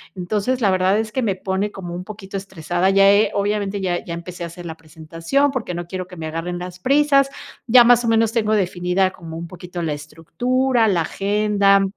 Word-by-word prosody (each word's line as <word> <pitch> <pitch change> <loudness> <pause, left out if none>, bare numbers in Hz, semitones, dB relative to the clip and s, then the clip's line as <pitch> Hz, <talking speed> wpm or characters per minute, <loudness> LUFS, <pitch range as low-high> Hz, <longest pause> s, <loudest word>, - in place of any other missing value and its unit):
Entonces, 210 +8 -1
la 205 - +3
verdad 185 +2 +2
es 220 -1 -3
que 260 - -1
me 200 -4 0
pone 190 +2 -2
como 175 -4 -7
un 180 - -5
poquito 195 -1 -8
estresada, 180 -1 -1
ya 195 0 +6
he, 205 +2 +3
obviamente 200 -1 -1
ya, 175 -2 -1
ya 170 - -6
empecé 170 +1 -7
a - - -3
hacer 170 +1 -11
la 160 - -6
presentación, 165 - -1
porque 230 -9 -4
no 175 0 -5
quiero 185 0 -5
que 180 -1 -12
me 160 - -5
agarren 165 +3 -4
las 180 0 -8
prisas. 275 +2 +3 0.4
Ya, 245 +1 +8
más 245 0 +5
o - - -1
menos, 225 -1 +3
tengo 220 -2 +1
definida 185 -1 +1
como 165 -3 -9
un 170 - -6
poquito 180 0 -8
la 160 -2 -1
estructura, 240 - 0
la 180 -5 +2
agenda, 200 +1 +2
190 Hz, 210 wpm, -20 LUFS, 175-215 Hz, 0.4 s, Ya